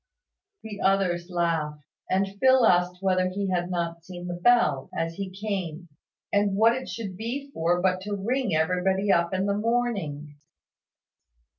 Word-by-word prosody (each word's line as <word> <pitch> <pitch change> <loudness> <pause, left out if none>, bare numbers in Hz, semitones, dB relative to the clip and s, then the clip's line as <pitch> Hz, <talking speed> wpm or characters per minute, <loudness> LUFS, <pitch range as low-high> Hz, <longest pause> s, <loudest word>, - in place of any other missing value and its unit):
The 210 -2 -7
others 185 -3 +1
laughed; 165 -4 -1 0.3
and 195 +1 0
Phil 260 -1 +5
asked 180 -1 +2
whether 185 -1 +2
he 195 +1 -2
had 175 -1 -1
not 170 -2 -3
seen 175 0 -9
the 175 - -4
bell, 175 - +3
as 165 0 -1
he 195 +2 -5
came; 185 -4 -4 0.4
and 200 -1 +2
what 225 +3 +5
it 260 +1 -5
should 205 -5 -5
be 260 +7 -5
for 175 -4 +1
but 185 0 +1
to 205 +1 -3
ring 230 0 -1
everybody 185 +5 +1
up 170 -2 +2
in 190 0 0
the 200 - +1
morning. 200 -11 -2
185 Hz, 155 wpm, -26 LUFS, 175-205 Hz, 0.4 s, Phil